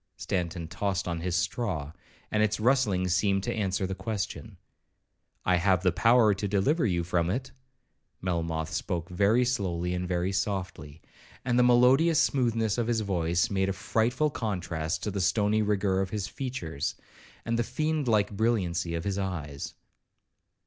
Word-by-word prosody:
Stanton 85 -2 -3
tossed 95 +3 -2
on 85 -1 -2
his 90 0 -2
straw, 85 - -2 0.4
and 105 - +2
its 110 0 +1
rustling 110 -6 +2
seemed 95 +2 +1
to 120 - -1
answer 95 -3 -1
the 95 - -3
question. 105 0 -5 0.9
'I 90 -1 +3
have 90 +1 +2
the 90 - +4
power 115 +2 +4
to 100 +1 -3
deliver 110 - +2
you 85 -3 0
from 85 0 0
it.' 130 +7 -3 0.7
Melmoth 85 -3 -2
spoke 85 -1 -3
very 100 +7 +3
slowly 90 -8 -1
and 90 0 -2
very 90 +1 0
softly, 95 -7 -3 0.4
and 125 -1 +2
the 125 0 +5
melodious 135 +7 +5
smoothness 115 -4 +1
of 115 - 0
his 115 -2 +1
voice 85 -3 0
made 95 -1 +1
a - - 0
frightful 120 +9 0
contrast 90 -7 -3
to 105 - -2
the 100 0 -2
stony 105 +3 +2
rigour 100 -2 +1
of 95 - -2
his 100 -1 -3
features, 100 - -4 0.5
and 115 0 0
the - - +3
fiend 155 +2 -1
like 105 -3 +2
brilliancy 95 -6 0
of 85 - -3
his 100 +1 -2
eyes. 80 -8 -4
95 Hz, 160 wpm, -28 LUFS, 90-115 Hz, 0.9 s, the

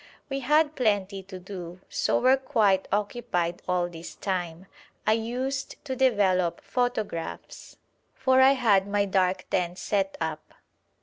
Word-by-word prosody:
We 275 0 -2
had 300 +3 +2
plenty 200 -5 0
to 190 0 -10
do, 180 -1 -8
so - - +1
were 255 +2 +5
quite 215 -8 +2
occupied 200 -5 -1
all 180 -1 +1
this 165 -1 -9
time. 180 -2 -3 0.4
I - - +4
used 250 +4 -2
to 265 -2 -3
develop 195 -9 +2
photographs, 220 -9 -3 0.4
for 260 0 +3
I 265 +1 +7
had 210 -7 +3
my 200 0 +1
dark 185 -1 +1
tent 180 -1 0
set 195 -1 -1
up. 160 -1 -5
200 Hz, 135 wpm, -27 LUFS, 180-250 Hz, 0.4 s, I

